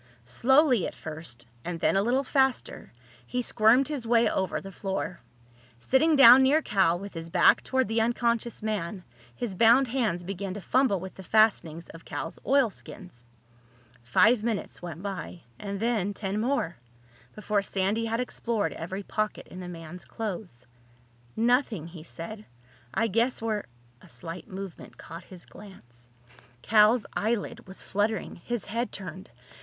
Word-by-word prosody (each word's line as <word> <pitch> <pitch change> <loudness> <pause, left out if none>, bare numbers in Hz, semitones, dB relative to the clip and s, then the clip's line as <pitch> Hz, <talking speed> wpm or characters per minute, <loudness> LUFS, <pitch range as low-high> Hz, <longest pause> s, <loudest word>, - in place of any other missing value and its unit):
Slowly 255 - +3
at - - -8
first, 155 -7 -8 0.2
and 175 -1 -4
then - - +2
a 195 - +4
little 250 +6 +1
faster, 265 -1 0 0.4
he 250 0 -2
squirmed 235 +4 +4
his 280 -6 -4
way 235 0 +4
over 190 -1 -1
the 195 - -9
floor. 190 -2 -4 0.6
Sitting 305 - +3
down 265 -2 +9
near 290 +4 +4
Cal, 190 -4 +2
with 200 +2 -8
his 165 -1 -6
back 175 0 +5
toward 260 -3 0
the 225 +1 +1
unconscious 235 -1 0
man, 200 -3 -3 0.3
his 225 - -3
bound 235 +6 +5
hands 225 -9 0
began 195 +1 -5
to - - -5
fumble 250 -1 +2
with 190 +1 -8
the - - -11
fastenings 185 -5 +2
of 165 - -12
Cal's 155 +3 -6
oilskins. 210 - -1 0.8
Five 210 - +4
minutes 225 -3 -3
went 175 0 -7
by, 190 -3 -5 0.2
and 200 -1 -5
then 215 -3 0
ten 200 +1 -3
more, 235 -9 -1 0.6
before 210 -1 0
Sandy 200 +3 -1
had 225 +1 -1
explored 235 -3 -2
every 190 +5 -5
pocket 215 +2 -3
in 180 - -9
the 180 -1 -7
man's 170 +1 -9
clothes. 185 - -6 0.7
"Nothing," 235 - +1
he 165 -1 -10
said. 175 +6 -8 0.5
"I 225 - +1
guess 230 +4 +1
we're—" 220 -2 -2 0.4
A - - -16
slight 165 +9 -7
movement 195 -1 -9
caught 170 +1 -10
his 180 -2 -13
glance. 120 - -15 0.5
Cal's 215 +1 +5
eyelid 215 -2 -2
was 190 - -11
fluttering. 205 0 -1
His 235 +5 -4
head 230 +4 -2
turned. 185 -1 -8
205 Hz, 150 wpm, -27 LUFS, 180-235 Hz, 0.8 s, down